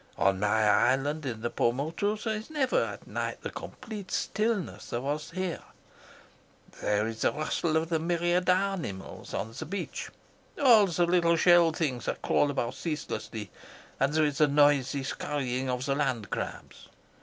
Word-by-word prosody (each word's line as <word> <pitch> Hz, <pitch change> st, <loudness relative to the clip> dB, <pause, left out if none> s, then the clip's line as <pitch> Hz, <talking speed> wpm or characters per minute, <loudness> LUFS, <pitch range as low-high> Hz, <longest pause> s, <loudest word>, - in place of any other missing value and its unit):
On 95 Hz, -1 st, +2 dB
my 105 Hz, +2 st, +2 dB
island 135 Hz, +7 st, +2 dB
in 115 Hz, -3 st, -4 dB
the 120 Hz, -, -2 dB
Paumotus 160 Hz, -, 0 dB
there 220 Hz, -, 0 dB
is 215 Hz, +4 st, -6 dB
never 285 Hz, -5 st, +1 dB
at -, -, -6 dB
night -, -, -4 dB
the -, -, -4 dB
complete 215 Hz, -6 st, -8 dB
stillness 215 Hz, -3 st, -1 dB
that -, -, -3 dB
there 120 Hz, -, -1 dB
was 145 Hz, +3 st, -3 dB
here. 185 Hz, -1 st, -3 dB, 1.2 s
There 105 Hz, 0 st, +1 dB
is 115 Hz, 0 st, -6 dB
the -, -, +3 dB
rustle 155 Hz, +1 st, 0 dB
of 160 Hz, +1 st, -1 dB
the 165 Hz, -2 st, +1 dB
myriad 175 Hz, +2 st, +1 dB
animals 180 Hz, -, -1 dB
on 110 Hz, +3 st, -3 dB
the 125 Hz, -, -6 dB
beach, 200 Hz, 0 st, -4 dB, 0.5 s
all 230 Hz, -7 st, +7 dB
the 175 Hz, 0 st, +1 dB
little 170 Hz, -1 st, +3 dB
shelled 170 Hz, -1 st, +5 dB
things 130 Hz, -8 st, -1 dB
that -, -, -3 dB
crawl 145 Hz, -, +3 dB
about 125 Hz, -3 st, -1 dB
ceaselessly, 130 Hz, -, -5 dB, 0.5 s
and 135 Hz, +1 st, +2 dB
there 155 Hz, 0 st, +3 dB
is 145 Hz, -2 st, -1 dB
the 150 Hz, -, +6 dB
noisy 145 Hz, -1 st, +3 dB
scurrying 130 Hz, -2 st, -2 dB
of 125 Hz, +1 st, -2 dB
the 140 Hz, -, +1 dB
land 120 Hz, -8 st, -1 dB
crabs. -, -, -6 dB
150 Hz, 165 wpm, -29 LUFS, 125-175 Hz, 1.2 s, all